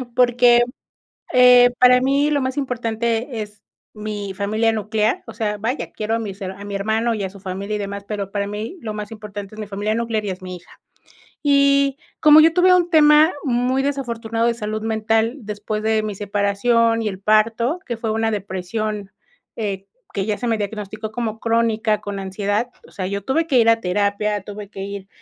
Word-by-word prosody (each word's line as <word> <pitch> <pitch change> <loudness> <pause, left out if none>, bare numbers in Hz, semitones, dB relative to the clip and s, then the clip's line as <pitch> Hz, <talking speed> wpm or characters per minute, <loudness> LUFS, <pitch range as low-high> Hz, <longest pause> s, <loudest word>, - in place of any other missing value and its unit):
porque, 245 -1 +5 0.7
eh, 250 -1 +7
para 250 0 +7
mí 275 +3 +2
lo 290 -1 +1
más 260 +1 -2
importante 235 -2 -2
es 210 0 -11 0.3
mi 210 -2 -5
familia 215 +3 +1
nuclear, 215 0 -1
o 225 - -8
sea, 210 -2 -2
vaya, 235 +7 -3
quiero 215 +1 -2
a - - +1
mis 205 -3 -6
a 190 +1 -6
mi 205 -1 -6
hermano 220 +4 0
y 205 -3 -3
a 190 - -4
su 200 +1 -14
familia 195 +2 -4
y - - -3
demás, 200 0 -5
pero 200 -2 -4
para 200 0 -2
mí 210 - -5
lo 215 -3 -5
más 210 -1 -6
importante 210 -2 -8
es - - -13
mi 210 - -5
familia 205 +2 -2
nuclear 230 -2 -1
y 200 - -2
es 185 0 -6
mi 185 0 -6
hija, 175 - -17 0.7
y 280 -1 +3 0.2
como 305 0 +8
yo 320 +1 +6
tuve 365 +1 +5
un 350 -1 +2
tema 305 0 +6
muy 255 0 +1
desafortunado 235 -5 -2
de 235 - +2
salud 215 -1 -4
mental 225 +2 0
después 215 0 -4
de 220 0 +1
mi 215 -1 -4
separación 205 +3 +1
y 215 - 0
el 190 -2 -6
parto, 225 - +2
que 240 - -3
fue 225 0 -3
una 225 +1 0
depresión, 205 +1 -4 0.5
eh, 200 -3 -4 0.3
que 195 -1 -2
ya 210 -2 0
se 245 - -3
me 225 -1 +1
diagnosticó 215 +1 -5
como 225 -2 -3
crónica 225 -2 +1
con 205 -1 -5
ansiedad, 205 +4 -2 0.2
o - - -19
sea, 185 - -4
yo 200 +1 -3
tuve 320 +5 +1
que 275 -6 +3
ir 230 -1 +4
a 230 0 +3
terapia, 205 +2 0
tuve 205 0 -8
que 195 - -10
ir 200 0 -6
220 Hz, 195 wpm, -21 LUFS, 205-240 Hz, 0.7 s, como